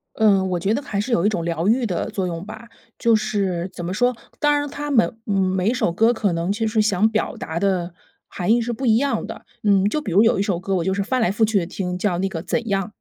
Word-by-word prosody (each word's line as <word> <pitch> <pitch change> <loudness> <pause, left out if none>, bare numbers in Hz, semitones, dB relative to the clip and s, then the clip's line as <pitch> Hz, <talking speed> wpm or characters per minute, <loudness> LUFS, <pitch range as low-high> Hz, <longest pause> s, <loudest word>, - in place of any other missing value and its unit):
嗯， 195 -4 +3
我 175 - 0
觉 195 +5 0
得 285 - -2
还 200 -5 -3
是 240 +4 -3
有 175 -3 +2
一 - - +4
种 175 -6 -2
疗 170 +2 -1
愈 240 +1 +2
的 180 -4 -2
作 190 -2 -2
用 170 +1 -4
吧。 220 +2 -10 0.3
就 230 -1 +3
是 195 -5 -1
怎 175 - -7
么 180 +2 -3
说， 245 +1 +1 0.2
当 295 -1 +3
然 290 0 -2
他 295 +1 -5
们， 230 -3 +2
嗯， 205 - -1
每 190 +1 +1
一 245 - +1
首 220 -9 0
歌 225 +6 +3
可 205 -5 0
能 170 +3 -1
其 220 +2 -1
实 215 0 +2
想 210 0 +2
表 220 - -1
达 160 +1 -4
的 180 -3 0 0.3
含 180 +5 0
义 240 - +3
是 240 +1 -2
不 255 +3 -3
一 220 -1 +5
样 270 -3 0
的。 - - -9 0.2
嗯， 200 -1 +3
就 300 - -1
比 200 - -5
如 200 +5 +5
有 230 -3 +3
一 - - +2
首 190 -4 -1
歌 195 +1 -2
我 170 -3 0
就 190 - 0
是 200 +1 0
翻 255 +3 0
来 205 - +2
覆 220 +3 +2
去 215 -2 +2
地 170 - -3
听， 180 0 -4
叫 180 -2 0
那 195 - 0
个 165 -4 -5
《怎 230 +5 -2
样》， 195 -1 0
205 Hz, 305 characters per minute, -22 LUFS, 180-225 Hz, 0.3 s, 一